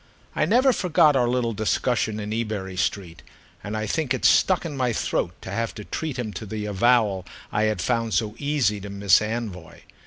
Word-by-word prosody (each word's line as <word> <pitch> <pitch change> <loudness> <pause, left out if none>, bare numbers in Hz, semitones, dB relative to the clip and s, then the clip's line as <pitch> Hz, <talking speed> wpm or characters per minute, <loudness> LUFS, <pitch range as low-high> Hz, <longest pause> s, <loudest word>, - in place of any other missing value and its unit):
I - - +2
never 255 +2 +4
forgot 165 -7 +3
our 125 -2 +3
little 120 -1 0
discussion 110 0 0
in 105 0 -4
Ebury 105 -5 -3
Street, 90 -2 -2 0.4
and 105 +2 -4
I 110 - -2
think 135 +3 0
it - - -3
stuck 185 -2 +4
in 155 -4 -4
my 125 -3 0
throat 90 -4 -2
to 95 - -7
have 115 +3 -2
to 105 - -8
treat 155 -5 -4
him 110 -4 -4
to 110 - -6
the 105 +1 -4
avowal 105 -2 +2 0.3
I 105 +1 +1
had 110 0 0
found 115 -3 0
so 110 -2 0
easy 140 -9 0
to 100 - -7
Mss 100 0 +3
Anvoy. 105 -6 -5
110 Hz, 195 wpm, -24 LUFS, 105-125 Hz, 0.4 s, never